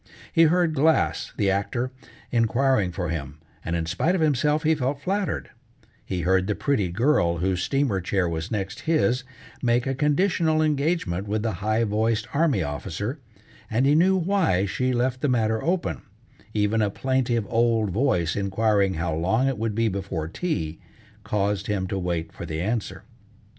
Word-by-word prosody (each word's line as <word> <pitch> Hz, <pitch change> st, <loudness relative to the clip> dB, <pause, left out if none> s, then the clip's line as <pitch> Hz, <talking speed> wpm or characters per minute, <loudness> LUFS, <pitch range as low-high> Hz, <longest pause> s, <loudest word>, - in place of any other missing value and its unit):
He 165 Hz, -, +6 dB
heard 170 Hz, 0 st, +3 dB
Glass, 155 Hz, +2 st, +2 dB
the 100 Hz, -3 st, +2 dB
actor, 120 Hz, +6 st, -1 dB, 0.4 s
inquiring 120 Hz, -3 st, +2 dB
for 90 Hz, -1 st, -3 dB
him, 75 Hz, -3 st, -4 dB, 0.3 s
and 85 Hz, -, -2 dB
in 85 Hz, -1 st, -1 dB
spite 125 Hz, -, 0 dB
of 180 Hz, -, 0 dB
himself 150 Hz, +1 st, +2 dB
he 160 Hz, +1 st, +4 dB
felt 140 Hz, -1 st, -1 dB
flattered; 195 Hz, +5 st, -2 dB, 0.5 s
he 90 Hz, -2 st, -3 dB
heard 95 Hz, +2 st, +2 dB
the 105 Hz, -, 0 dB
pretty 110 Hz, -11 st, 0 dB
girl 90 Hz, -, +2 dB
whose 90 Hz, +1 st, 0 dB
steamer 135 Hz, -9 st, 0 dB
chair 90 Hz, 0 st, 0 dB
was 80 Hz, -1 st, -3 dB
next 100 Hz, -2 st, -3 dB
his, 125 Hz, -6 st, +2 dB, 0.4 s
make 120 Hz, -1 st, +2 dB
a 135 Hz, -, 0 dB
conditional 155 Hz, +3 st, +2 dB
engagement 145 Hz, -, 0 dB
with 105 Hz, +1 st, -1 dB
the 115 Hz, -, 0 dB
high 110 Hz, +2 st, +1 dB
voiced 110 Hz, +1 st, 0 dB
army 140 Hz, -, +2 dB
officer, 80 Hz, -, -4 dB, 0.5 s
and 120 Hz, +4 st, +1 dB
he 140 Hz, -, +4 dB
knew 185 Hz, +5 st, +4 dB
why 175 Hz, -, +2 dB
she 130 Hz, +6 st, -1 dB
left 125 Hz, +1 st, 0 dB
the 145 Hz, -, +1 dB
matter 110 Hz, -3 st, +1 dB
open; 165 Hz, -, -1 dB, 0.5 s
even 105 Hz, +1 st, +1 dB
a 105 Hz, -, +2 dB
plaintive 120 Hz, -1 st, 0 dB
old 115 Hz, -2 st, +2 dB
voice 90 Hz, -, +1 dB
inquiring 100 Hz, -1 st, +1 dB
how 80 Hz, 0 st, -2 dB
long 95 Hz, +11 st, +1 dB
it 135 Hz, -5 st, -1 dB
would 110 Hz, -2 st, -1 dB
be 115 Hz, 0 st, +2 dB
before 95 Hz, -5 st, -3 dB
tea, 80 Hz, -, -3 dB, 0.4 s
caused 105 Hz, -1 st, -1 dB
him 100 Hz, -3 st, -1 dB
to 95 Hz, +1 st, -3 dB
wait 85 Hz, -3 st, -2 dB
for 85 Hz, -, -7 dB
the 80 Hz, -1 st, -3 dB
answer. 110 Hz, +5 st, -2 dB
110 Hz, 170 wpm, -25 LUFS, 95-140 Hz, 0.5 s, He